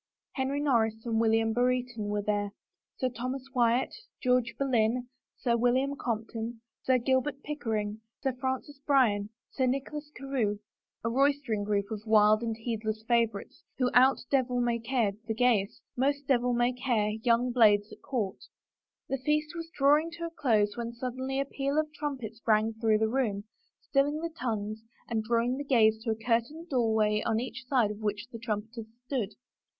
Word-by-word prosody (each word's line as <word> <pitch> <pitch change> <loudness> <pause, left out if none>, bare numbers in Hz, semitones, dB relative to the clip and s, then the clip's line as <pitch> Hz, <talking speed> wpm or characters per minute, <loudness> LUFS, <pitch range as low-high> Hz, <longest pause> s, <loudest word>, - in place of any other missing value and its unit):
Henry 270 +1 -1
Nor 275 -6 +3
ris 220 0 -1
and 225 -1 0
William 225 0 +3
Brereton 245 -2 0
were 205 0 -1
there, 205 -1 -1 0.4
Sir 255 - 0
Thomas 255 +2 -4
Wyatt, 240 0 +2 0.3
George 250 -2 +1
Boleyn, 245 -2 +1 0.3
Sir 235 -2 +1
William 255 +4 +2
Compton, 225 -1 -4 0.2
Sir 260 -1 +3
Gilbert 265 +3 0
Pick 300 0 -5
ering, 215 -1 -2 0.2
Sir 265 - +2
Francis 260 +2 -4
Bryan, 245 -8 +2 0.2
Sir 260 -2 +1
Nicholas 285 +3 -3
Carewe 255 -7 -1 0.2
— - - -57
a - - +2
rois 275 +3 +4
tering 215 -3 0
group 200 0 -1
of 215 -2 -4
wild 215 0 +5
and 225 -2 -2
heedless 220 -1 -3
favorites 230 -4 0
who 250 -1 +1
out 260 +2 +6
devil 255 -2 +2
may 240 -1 +1
cared 230 -4 0
the 220 - -1
gayest, 230 -5 +1
most 280 +2 0
devil 250 -3 +2
may 240 +1 +2
care 235 -4 0
young 240 +2 +2
blades 210 -3 +4
at - - -14
court. 215 -8 -3 0.6
The 270 - -2
feast 300 +3 0
was 330 -1 -6
drawing 295 +3 +3
to 340 0 -5
a 335 - -5
close 220 -10 +2
when 235 0 -4
suddenly 260 +2 -3
a 275 - +1
peal 275 +1 -2
of 310 0 0
trumpets 255 -8 -5
rang 220 0 +3
through 220 -1 +2
the 220 +1 +2
room, 220 -5 0 0.4
stilling 290 +2 +2
the 335 -1 -4
tongues 215 -5 -3 0.3
and 225 -2 0
drawing 235 +3 +1
the 285 - -3
gaze 220 -5 +4
to 230 - -2
a 220 - +1
curtained 235 +9 -1
doorway 220 -4 +2
on 225 -1 +1
each 250 0 -6
side 245 -6 +2
of 210 - -8
which 210 -1 -2
the 230 - -7
tnmipeters 220 0 -4 0.2
stood. 230 -7 -2
240 Hz, 175 wpm, -29 LUFS, 220-265 Hz, 0.6 s, out